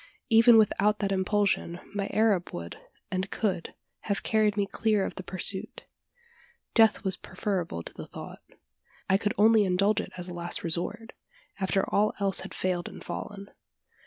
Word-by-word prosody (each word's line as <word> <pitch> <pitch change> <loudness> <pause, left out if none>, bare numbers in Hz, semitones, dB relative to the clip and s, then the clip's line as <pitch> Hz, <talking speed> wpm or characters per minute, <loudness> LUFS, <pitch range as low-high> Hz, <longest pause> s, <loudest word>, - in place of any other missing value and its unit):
Even 225 +1 +7
without 210 -1 +3
that 200 -2 -1
impulsion, 190 -2 0
my 200 -1 -2
Arab 210 -5 +2
would, 85 0 -6 0.4
and 190 +1 -2
could, 190 -6 -2 0.2
have 200 -2 -2
carried 215 -1 +2
me 200 - +2
clear 210 -1 +1
of - - -4
the - - -7
pursuit. 190 +1 -2 0.9
Death 225 -2 +4
was 190 -2 0
preferable 185 - -3
to - - -9
the - - -9
thought. - - -9 0.7
I 190 +1 +3
could 210 +2 -1
only 220 0 +6
indulge 195 +2 +2
it - - -9
as 180 0 -6
a 180 - -6
last 175 0 -2
resort 175 +7 -3 0.5
after 195 0 +1
all 210 +1 +1
else 195 -1 +3
had - - -6
failed 180 -2 -1
and - - -11
fallen. 200 -1 -7
200 Hz, 160 wpm, -28 LUFS, 185-210 Hz, 0.9 s, Even